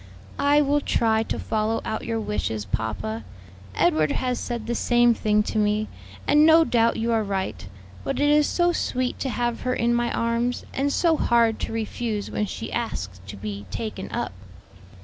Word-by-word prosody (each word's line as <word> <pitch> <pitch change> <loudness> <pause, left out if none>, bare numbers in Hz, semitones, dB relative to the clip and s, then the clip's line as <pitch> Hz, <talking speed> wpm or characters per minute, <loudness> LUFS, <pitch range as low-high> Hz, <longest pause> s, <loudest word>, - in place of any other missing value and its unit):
"I 290 +1 +4
will 290 0 +2
try 220 -4 +2
to 225 - -3
follow 220 +1 -1
out 220 - -3
your 225 -1 -1
wishes, 110 - -2
papa. 110 +2 -3 0.5
Edward 155 - +2
has 250 -2 -1
said 235 -2 -4
the 235 - -2
same 240 0 +4
thing 210 -1 +2
to 215 - -2
me, 210 +1 +1 0.4
and 295 +1 +5
no 320 +1 +7
doubt 230 -3 +2
you 230 +1 -1
are 225 -1 +2
right; 190 - -3 0.4
but - - -2
it 290 0 +3
is 300 0 +4
so 350 0 +2
sweet 255 -6 -1
to 270 - -2
have 240 -1 -1
her 255 0 0
in 235 +1 +1
my 240 0 +1
arms, 235 +1 -1
and 280 +2 0
so 325 +1 +2
hard 230 -4 +3
to - - -3
refuse 225 -1 -3
when 210 - -1
she - - -6
asks 95 - -4
to 100 +1 -8
be 100 0 -6
taken 215 -4 -5
up." - - -3
230 Hz, 185 wpm, -24 LUFS, 210-250 Hz, 0.5 s, no